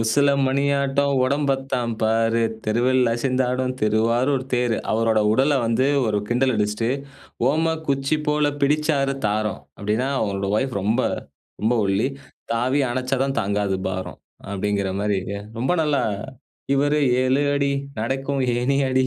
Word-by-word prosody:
"உசில 140 +6 +3 0.2
மணியாட்டம் 140 +1 +1
உடம்பத்தான் 135 -3 0
பாரு, 115 +1 +2 0.2
தெருவில் 120 +4 +2
அசைந்தாடும் 130 +1 0
திருவாரூர் 115 +5 +2
தேரு." 120 -2 +1
அவரோட 110 0 +2
உடல 135 +6 +3
வந்து 115 +3 +2 0.2
ஒரு 105 -1 +1
கிண்டல் 125 +2 +2
அடிச்சிட்டு, 105 +2 0 0.6
"ஓம 160 +2 +1
குச்சி 140 +2 +1
போல 150 0 +2
பிடிச்சாரு 145 -1 +2
தாரம்." 105 +1 -1 0.2
அப்பிடீன்னா, 110 +6 -1
அவரோட 100 -2 -1
வைஃப் 130 +2 -1
ரொம்ப 110 +6 +1 0.6
ரொம்ப 110 +3 +2
ஒல்லி. 100 +6 +1 0.4
"தாவி 125 +5 +1
அணைச்சாதான் 130 +2 -1
தாங்காது 100 -1 -1
பாரம்" 95 0 -5 0.3
அப்பிடீங்கிற 100 0 -1
மாரி 105 -1 +1 0.4
ரொம்ப 130 +8 +1
நல்லா 150 -3 +1 0.7
"இவரு 145 +2 +2 0.2
7 130 +2 +2
அடி. 140 0 +1 0.3
நடக்கும் 135 +3 -1
ஏணியடி. 130 +1 +1
130 Hz, 120 wpm, -22 LUFS, 110-140 Hz, 0.7 s, உசில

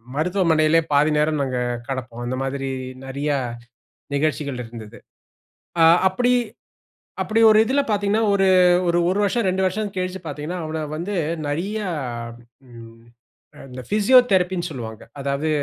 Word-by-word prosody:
மருத்துவமனையிலயே 165 -2 +2
பாதி 145 +2 +4
நேரம் 150 -1 +1
நாங்க 130 -2 -2 0.3
கெடப்போம். 125 -3 -5
அந்த 130 +1 -2
மாதிரி 135 0 -3 0.4
நிறைய 140 +3 -3 0.9
நிகழ்ச்சிகள் 140 -3 -1
இருந்தது. 115 -2 -11 0.9
ஆ - - +7 0.3
அப்படி 245 +5 +1 0.9
அப்படி 225 +1 0
ஒரு 215 - +5
இதில 270 +5 +1
பார்த்தீங்கன்னா, 205 +1 +1
ஒரு 195 -1 +3 0.4
ஒரு 170 0 +2
ஒரு 195 - 0
வருஷம் 230 0 0
2 190 +1 0
வருஷம் 205 +3 -1
கழிச்சு 185 0 -3
பார்த்தீங்கன்னா, 155 +4 -5
அவனை 155 0 -4
வந்து 190 +5 -4 0.3
நிறைய 190 +9 -2 0.9
ம் 115 -1 -13 0.7
இந்த 130 0 -8
பிசியோதெரபி 205 -4 +4
ன்னு 175 +1 -3
சொல்வாக. 110 -6 -8
அதாவது 140 +3 -2
160 Hz, 125 wpm, -22 LUFS, 135-195 Hz, 0.9 s, ஆ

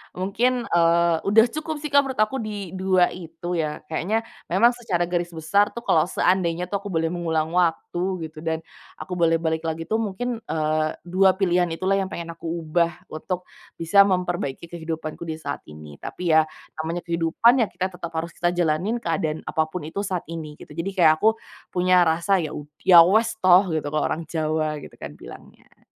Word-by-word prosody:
mungkin, 235 +7 0
eee, 170 0 +4
udah 220 +3 +6
cukup 310 +1 -4
sih, 300 - -4
Kak, 285 - +6
menurut 265 -3 -6
aku 265 +5 -3
di 205 -5 -5
2 185 -1 +3
itu 170 0 -5
ya, 150 -1 -3
kayaknya 210 +8 0 0.2
memang 220 +7 +4
secara 225 -8 -2
garis 175 0 -2
besar 200 +6 +2
tuh 235 - -6
kalau 160 -5 +3
seandainya 180 -2 +1
tuh 200 - 0
aku 205 - -8
boleh 165 -3 -1
mengulang 160 -2 -1
waktu 175 0 0 0.2
gitu 155 0 -8
dan 160 0 -3 0.3
aku 185 - -7
boleh 165 -1 +4
balik 160 0 -1
lagi 160 0 -3
tuh, 220 +6 -1
mungkin, 225 +3 -3
eee, 155 0 0
2 185 +2 +3
pilihan 180 -2 +2
itulah 195 +3 +1
yang 190 - -1
pengen 170 -1 -5
aku - - -6
ubah 170 0 0 0.2
untuk 180 +3 -4 0.3
bisa 200 +4 +5
memperbaiki 175 -5 -2
kehidupanku 160 -1 -5
di 160 - -3
saat 145 -3 -5
ini, 75 -2 -12
tapi 175 -2 -3
ya 155 0 +5 0.3
namanya 165 +2 -3
kehidupan 170 +9 +3
ya 225 - +2
kita 185 0 -3
tetap 170 -2 -7
harus 170 +1 -3
kita 175 - +1
jalanin 175 +6 +1
keadaan 160 -5 -2
apa 160 0 0
pun 175 +1 -6
itu 180 - -5
saat 185 -3 -2
ini 155 -2 -6
gitu, - - -13
jadi 165 +5 -3
kayak 165 -4 +6
aku 220 +4 +4 0.4
punya 180 -1 +4
rasa 170 +4 +2
ya 160 -3 -4
u 150 - -6 0.2
ya 175 -3 +9
uwes 220 +5 +2
toh 185 +1 +6
gitu 155 -2 -2
kalo 150 -1 0
orang 165 - -3
Jawa 155 -1 -1
gitu - - -12
kan 75 - -7
bilangnya. - - -14
170 Hz, 190 wpm, -23 LUFS, 160-190 Hz, 0.4 s, ya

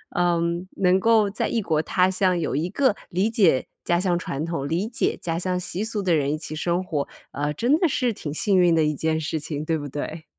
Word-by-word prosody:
嗯， 170 0 +1
能 185 0 +3
够 220 -1 +4
在 210 - -1
异 230 - 0
国 155 -4 +1
他 185 +3 +2
乡 185 -1 +2
有 160 - -2
一 160 +5 -1
个 260 0 +2
理 185 +4 +1
解 185 - +3 0.2
家 175 0 +1
乡 180 -2 +1
传 145 -3 -4
统、 165 -5 -3
理 180 +6 0
解 235 - -1
家 165 -1 -2
乡 180 0 -1
习 180 +2 -3
俗 220 -2 -2
的 180 -2 +2
人 145 -2 +1
一 155 - -1
起 155 0 -6
生 175 +3 0
活， 150 -6 -2 0.2
呃， 145 +2 -2
真 260 - +2
的 350 - +3
是 250 -4 0
挺 150 -7 -6
幸 190 +5 +2
运 175 -2 +4
的 160 - +3
一 150 0 +1
件 160 +2 0
事 160 0 -2
情， 150 0 -5
对 160 0 0
不 145 - -5
对？ 155 +3 -5
175 Hz, 255 characters per minute, -24 LUFS, 155-190 Hz, 0.2 s, 够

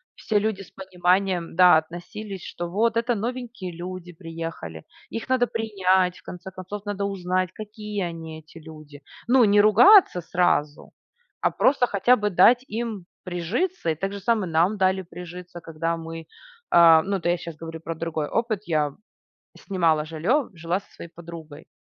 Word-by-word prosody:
все 220 - -1
люди 210 -1 -2
с 195 - -12
пониманием, 185 -2 0
да, 180 -2 +7
относились, 180 +5 -6
что 175 0 -6
вот- 225 +5 +1
это 235 +1 +1
новенькие 235 -3 -5
люди 175 0 -7
приехали, 165 - -7 0.3
их 225 - -4
надо 255 -1 +2
принять, 190 -5 +1
в - - -20
конце 185 +1 -9
концов, 185 +2 -7
надо 200 -1 -2
узнать, 185 -2 -1
какие 210 -1 -6
они, 160 -1 -8
эти 160 +1 -15
люди. 155 -2 -13 0.3
Ну, 250 +1 +5
не 205 0 +4
ругаться 215 - +6
сразу, 155 -4 0 0.5
а - - +3
просто 260 -2 +2
хотя 210 +5 +3
бы 210 -3 -1
дать 230 +7 +5
им 220 -4 -4 0.2
прижиться. 185 - -2
И 160 - +1
так 195 +5 -4
же 200 - -5
самое 205 -4 0
нам 175 +6 +2
дали 190 0 +2
прижиться, 175 0 -10
когда 165 +1 -3
мы, 165 -1 -8 0.4
э-э, 165 -2 +7
ну, 200 +1 -1
это 175 -2 -2
я 175 - +2
сейчас 170 -1 -8
говорю 165 0 -8
про 165 +1 -6
другой 160 -2 -3
опыт. 225 +1 -1
Я 150 -4 0 0.7
снимала 165 -5 +1
жилье, 190 - 0
жила 170 +3 -2
со - - -26
своей 170 - -11
подругой 165 -3 -11
180 Hz, 165 wpm, -24 LUFS, 165-210 Hz, 0.7 s, да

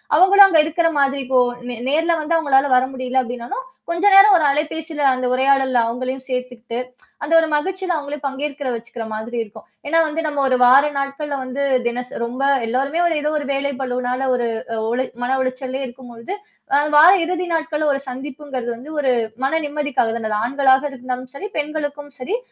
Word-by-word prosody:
அவங்களும் 390 +4 +7
அங்க 335 -5 +3
இருக்குற 330 +2 +1
மாதிரி 275 0 +1
இப்போ 260 -1 +3 0.3
நே 245 - -4 0.2
நேர்ல 325 +3 +2
வந்து 330 +2 0
அவங்களால 280 -4 +3
வர 250 - +3
முடியல 255 0 0
அப்டின்னாலும், 245 - -6 0.3
கொஞ்ச 340 +3 -1
நேரம் 395 +1 +8
ஒரு 315 - +1
அலைபேசியில 305 +2 -2
அந்த 255 0 -3
உரையாடல்ல 265 -1 +2
அவங்களையும் 255 +3 -4
சேர்த்துக்கிட்டு, 250 -2 -5 0.5
அந்த 295 +3 -1
ஒரு 325 - +1
மகிழ்ச்சியில 370 +4 -2
அவங்களே 290 0 -5
பங்கேற்கிற 280 +1 -4
வச்சுக்கிற 230 0 -7
மாதிரி 220 +3 -5
இருக்கும். 210 -2 -14 0.2
ஏன்னா, 330 +3 +3
வந்து 310 +1 -3
நம்ம 290 -2 -1
ஒரு 260 - +2
வார 260 +4 +7
நாட்கள்ல 275 +1 -3
வந்து 260 +2 -3 0.2
தினசரி 245 +1 -4
ரொம்ப 245 +3 -6 0.3
எல்லோருமே 275 +7 -1
ஒரு 340 - 0
ஏதோ 300 - 0
ஒரு 290 - -6
வேலை 280 +1 -1
பழுனால 250 0 -2
ஒரு 240 -1 -1 0.4
ஒளி 255 +2 0 0.2
மன 255 +2 +1
உளைச்சல்லே 260 +1 -3
இருக்கும்பொழுது, 240 +4 -9 0.4
அ - - +4 0.2
வார 320 +4 +9
இறுதி 360 +1 -2
நாட்கள்ல 315 -2 -1
ஒரு 275 - -2
சந்திப்புங்கிறது 265 -1 -6
வந்து 250 +6 -11
ஒரு 270 -3 +2 0.3
மன 270 - +1
நிம்மதிக்காக 290 -5 -1
தான 220 -2 -4
அது. 210 - 0
ஆண்களாக 265 +1 +3
இருந்தாலும் 255 -1 -6
சரி, 415 +9 -6
பெண்களுக்கும் 290 -1 -4
சரி, 380 - -2
275 Hz, 175 wpm, -20 LUFS, 255-300 Hz, 0.5 s, வார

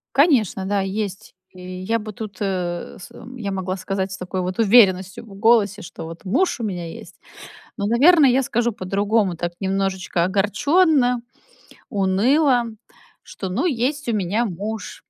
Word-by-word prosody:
Конечно 240 - +3
да, 200 0 0
есть. 195 +1 -4 0.2
И 185 - -14 0.2
я 225 +4 0
бы 215 0 -7
тут, 205 -2 -8
э, 180 -3 -3
с - - -11
м 245 +2 -12
я 205 -4 -4
могла 190 0 -3
сказать 190 +1 -3
с - - -5
такой 185 +1 -4
вот 180 +2 -4
уверенностью 195 -3 +4
в 200 -3 -13
голосе, 215 -1 +3
что 160 - -9
вот 165 +4 -10
муж 265 - 0
у - - -2
меня 175 -5 -4
есть. - - -11 0.6
Но, 200 -1 -1
наверно, 290 +7 +5
я 260 +1 +4
скажу 240 0 0
по-другому, 200 -1 0
так 175 +1 -4
немножечко 190 -2 -1
огорчённо, 245 - +2 0.7
уныло, 240 +7 +2 0.6
что, 190 - -7
ну, 185 - -1
есть 280 -1 -1
у - - +1
меня 205 +4 0
муж, 205 +1 -6
205 Hz, 160 wpm, -21 LUFS, 190-235 Hz, 0.7 s, наверно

